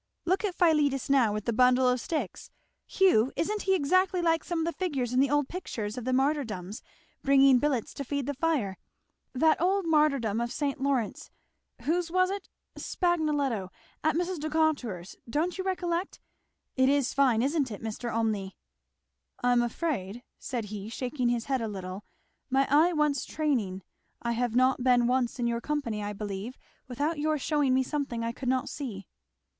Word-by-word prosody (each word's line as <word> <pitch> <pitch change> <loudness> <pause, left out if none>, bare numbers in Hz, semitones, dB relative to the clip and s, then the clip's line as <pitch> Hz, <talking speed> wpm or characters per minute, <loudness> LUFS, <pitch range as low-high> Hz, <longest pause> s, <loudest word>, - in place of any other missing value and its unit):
Look 375 +4 +1
at 390 -4 -1
Philetus 295 -7 +2
now 255 -6 +4
with 210 0 -3
that 235 - 0
bundle 250 +2 +4
of 250 -1 +2
sticks 320 - -4 0.4
Hugh! 275 - +3
isn't 415 +5 -1
he 385 0 +2
exactly 370 +4 +2
like 330 -1 +2
some 345 - -3
of 325 - 0
the 335 - 0
figures 275 -10 -1
in 255 - +3
the 275 0 +4
old 290 -1 +2
pictures 225 - -5
of 250 -2 -6
the 255 - 0
martyrdoms, 255 -8 -1 0.4
bringing 275 -2 +5
billets 265 -5 -1
to 280 - -5
feed 280 0 -2
the 285 - -2
fire? 275 -10 -1 0.5
that 310 +4 +3
old 380 +1 +2
martyrdom 275 -9 +2
of 235 0 -2
St. 280 0 -2
Lawrence 270 -6 -1 0.5
whose 340 +2 0
was 370 +2 +2
it 400 -1 -5 0.3
Spagnoletto! 295 - 0 0.3
at 315 - +2
Mrs. 355 0 -1
Decatur's 295 - -1
don't 330 +9 -1
you - - -1
recollect? 360 -1 -2 0.6
It 260 0 +4
is 280 -2 +2
fine, 255 -5 +3
isn't 280 -1 +1
it, 210 -1 -8
Mr. 225 +2 -4
Olmney?" 215 -4 -1 0.9
"I 245 - +4
am 245 -1 +4
afraid," 240 - -3 0.2
said 240 -4 -4
he 205 0 -6
shaking 250 +1 -2
his 240 -1 -1
head 265 -3 0
a 225 - -2
little, 190 -1 -6 0.4
"my 270 +1 +3
eye 315 +5 +5
wants 300 -4 +1
training. 225 - -1 0.4
I 235 - -2
have 235 0 -1
not 255 0 +3
been 245 -2 +4
once 250 0 +1
in 240 - -1
your 235 0 -1
company 240 -7 -2
I 205 0 -3
believe 205 +3 -5 0.3
without 290 +5 -2
your 310 +1 +1
shewing 285 -2 +1
me 260 - +3
something 265 -4 -3
I 230 - -1
could 250 +1 -4
not 260 +1 +1
see." 220 -9 -6
270 Hz, 175 wpm, -28 LUFS, 235-310 Hz, 0.9 s, bringing